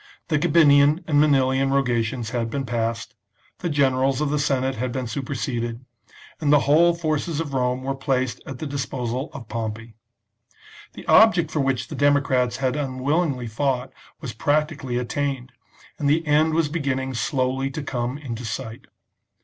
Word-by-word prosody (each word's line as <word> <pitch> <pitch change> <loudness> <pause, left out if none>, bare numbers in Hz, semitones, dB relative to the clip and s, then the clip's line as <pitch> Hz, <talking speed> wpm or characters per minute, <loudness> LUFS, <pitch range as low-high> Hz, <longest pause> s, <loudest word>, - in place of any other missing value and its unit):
The 155 -2 +2
Gabinian 150 0 +5
and 145 -2 +4
Manilian 135 -2 +3
rogations 120 -3 0
had 115 -2 -1
been 135 +3 -3
passed; 115 -1 -2 0.5
the 175 - -2
generals 135 -2 +2
of 150 -1 0
the 150 - +1
Senate 135 -2 0
had 125 +1 -3
been 130 0 -3
superseded; 120 -2 -4 0.5
and 150 -2 +1
the 145 -1 +6
whole 165 +4 +4
forces 155 -1 -2
of 150 -4 -4
Rome 125 0 0
were 135 +1 -1
placed 130 -2 -1
at 135 - -6
the 155 - -5
disposal 130 -1 -3
of 120 -5 -9
Pompey. 115 0 -5 1.0
The - - -11
object 185 -8 +5
for 155 - -1
which 135 -2 0
the - - -6
democrats 140 -4 +2
had 130 -1 0
unwillingly 140 0 -1
fought 125 +2 -2 0.3
was 130 -7 -5
practically 145 0 0
attained, 130 0 -2 0.5
and 145 -2 +1
the 160 +3 +2
end 155 +1 +3
was 165 -2 +2
beginning 135 -4 -2
slowly 130 +2 -1
to 145 +2 -5
come 125 -1 -3
into 125 -5 -6
sight. 110 +1 -6
135 Hz, 155 wpm, -23 LUFS, 125-145 Hz, 1.0 s, the